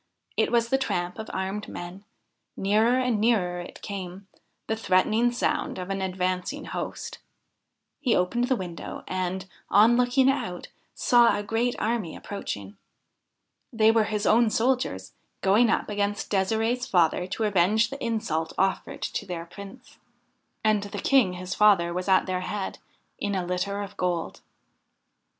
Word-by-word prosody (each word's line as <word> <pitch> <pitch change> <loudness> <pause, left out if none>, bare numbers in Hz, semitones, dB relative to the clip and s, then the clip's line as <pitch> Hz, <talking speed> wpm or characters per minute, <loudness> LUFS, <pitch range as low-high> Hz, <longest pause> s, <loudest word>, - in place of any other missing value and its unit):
It - - +1
was 235 -1 +2
the 270 - +2
tramp 175 -6 -2
of 220 - -6
armed 190 +2 -3
men; 180 +3 -8 0.5
nearer 220 +6 +3
and 245 -5 +1
nearer 190 -6 +2
it 175 - -11
came 195 -1 -6 0.4
the 220 - -1
threatening 220 +3 +2
sound 240 - -1
of 185 +1 -5
an 195 0 -2
advancing 185 +8 -2
host. - - -5 0.8
He 255 -6 +2
opened 235 +7 +1
the 260 +1 +1
window, 180 -6 -6
and, 185 0 -2 0.2
on 225 +4 +6
looking 250 +2 +3
out, 180 -10 -1 0.3
saw 240 -3 +4
a 205 - -3
great 225 +4 0
army 220 -7 -1
approaching. 100 - -6 0.9
They 220 -1 +4
were 225 -1 +3
his 210 0 -2
own 230 +1 +5
soldiers, 225 - 0 0.3
going 215 +5 +4
up - - +1
against 205 0 -2
De'sirde's 225 +5 +1
father 175 0 +2
to 220 - -3
avenge 210 +3 +3
the 275 - -6
insult 215 -9 -1
offered 190 -1 -1
to - - -3
their 170 -2 -5
Prince. 200 +8 -12 0.6
And 215 -1 +3
the 205 0 -6
King 220 -3 +3
his 180 +1 -5
father 190 -5 +4
was 180 +2 -3
at 190 -1 +4
their 185 -1 -2
head, 200 +1 -4 0.4
in 205 -1 -1
a 185 -2 -1
litter 190 +3 -2
of 200 0 -10
gold. 175 -2 -2
205 Hz, 150 wpm, -26 LUFS, 185-230 Hz, 0.9 s, on